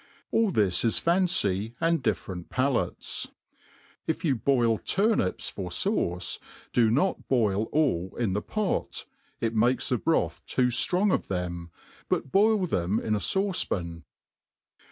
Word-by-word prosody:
All 225 -2 +3
this 100 - +2
is 115 -2 +2
fancy, 120 - +1
and 165 -2 +2
dfiFerent 90 -4 -3
palates. 130 0 -1 0.8
If 160 +2 -2
you 140 -5 +3
boil 120 -2 +2
turnips 200 - +1
for - - -5
fauce, 90 +1 -1 0.3
do 115 -3 +4
not 145 - 0
boil 110 -5 +2
all 110 - 0
in 115 -6 0
the 105 - -1
pot, 210 - -2 0.4
it 115 -1 0
makes 120 +3 +2
the 125 - +1
broth 165 - 0
too 125 -1 +2
ftrong 180 - +2
of - - -1
them, 85 -2 -4 0.4
but 135 - -1
boil 210 -1 +4
them 95 - 0
in 110 - -1
a 105 - +1
fauce 195 - +1
pan. 85 -2 -4
120 Hz, 140 wpm, -27 LUFS, -, 0.8 s, do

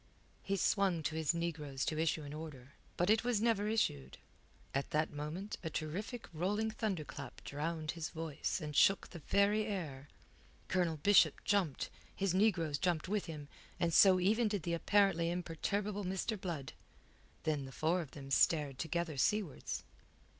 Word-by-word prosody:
He 195 - -1
swung 190 -4 +2
to 155 - -2
his 160 -2 +2
negroes 150 -5 -2
to 155 - -1
issue 160 -1 +1
an 145 0 -7
order. 150 -4 -8 0.2
But 175 +4 +3
it 220 +2 +3
was 240 -3 +1
never 220 -2 +2
issued. 70 - 0 0.6
At 135 +1 -1
that 155 +1 0
moment 155 +8 -5
a 160 - -2
terrific 185 +11 -4
rolling 205 +7 0
thunderclap 155 - -4
drowned 155 +2 -3
his 165 -3 -4
voice 160 0 -3
and 150 -1 -5
shook 195 +6 +4
the 170 - -8
very 205 +7 +2
air. 150 -9 -4 0.6
Colonel 175 -3 +1
Bishop 160 -2 +5
jumped, 190 -9 +1 0.2
his 195 -2 0
negroes 180 -8 +2
jumped 175 -4 0
with 210 -1 0
him, 150 -3 -7 0.3
and 170 -1 +1
so 185 +1 +7
even 215 +5 +3
did 205 -5 -2
the 170 - -1
apparently 170 -1 +3
imperturbable 195 +4 -2
Mr. 190 +4 -1
Blood. 155 -8 -4 0.7
Then 150 -4 0
the 135 - -9
four 165 +6 +1
of 155 - -8
them 135 0 -10
stared 145 -2 +3
together 165 -2 -2
seawards. 200 +3 0
170 Hz, 160 wpm, -35 LUFS, 150-200 Hz, 0.7 s, so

